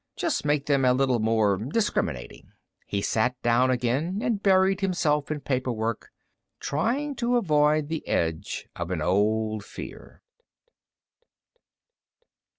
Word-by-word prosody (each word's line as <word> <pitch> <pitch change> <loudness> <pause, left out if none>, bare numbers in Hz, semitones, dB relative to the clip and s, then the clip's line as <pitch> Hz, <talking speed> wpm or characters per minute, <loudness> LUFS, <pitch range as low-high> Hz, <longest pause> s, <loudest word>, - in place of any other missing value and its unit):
Just - - -1
make 145 -1 +1
them 140 -2 +2
a 125 -1 +5
little 130 -2 +2
more 110 -3 +2
discriminating. 110 - -2 0.3
He 100 0 -2
sat 125 +3 0
down 120 +2 +3
again 130 - 0
and 220 -4 0
buried 190 0 +3
himself 155 -6 0
in 155 -1 -3
paperwork, 120 -5 -2 0.5
trying 250 - -1
to 245 -1 +1
avoid 150 -6 +2
the 160 0 -4
edge 80 -1 -2
of 85 -1 -4
an 85 -4 -2
old 110 +3 +1
fear. - - -10
130 Hz, 120 wpm, -26 LUFS, 110-165 Hz, 0.5 s, a